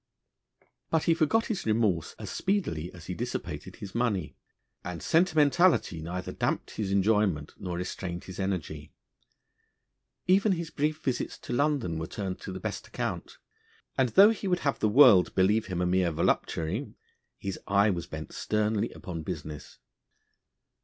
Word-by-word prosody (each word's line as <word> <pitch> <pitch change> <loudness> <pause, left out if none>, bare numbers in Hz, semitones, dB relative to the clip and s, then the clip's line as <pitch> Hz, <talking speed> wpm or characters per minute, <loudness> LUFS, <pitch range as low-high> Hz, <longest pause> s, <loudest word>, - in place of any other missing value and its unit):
But 160 -1 +2
he 165 - +4
forgot 165 +8 +2
his 205 - -3
remorse 105 -7 +1
as - - -7
speedily 90 - -1
as 90 -3 -12
he 90 - -4
dissipated 120 +6 -5
his 100 -1 -9
money, 105 -9 -1 0.5
and 90 -1 -5
sentimentality 160 - +3
neither 90 +3 -4
damped - - -2
his 100 -2 -3
enjoyment 100 -6 +2
nor 90 -2 -4
restrained 90 -1 -4
his 95 0 -9
energy. 80 -6 -3 1.3
Even 195 +2 +4
his 170 -2 -4
brief 155 +1 -1
visits 130 -3 -2
to - - -5
London 135 - +1
were 80 - -4
turned 95 -3 -5
to - - -6
the 95 - -6
best - - -5
account; - - -4 0.6
and, 130 -2 +2
though 200 - +7
he 215 -3 -4
would 180 -1 +1
have 140 - 0
the 110 - +2
world 105 -6 +7
believe 105 +3 +3
him 90 -2 -2
a - - +2
mere 90 0 +2
voluptuary, 80 0 -1 0.4
his 95 -1 -5
eye 100 +2 +4
was 85 -3 -4
bent 80 -2 -7
sternly 105 +1 0
upon 85 -3 -6
business. 75 -3 -7
100 Hz, 155 wpm, -28 LUFS, 90-145 Hz, 1.3 s, though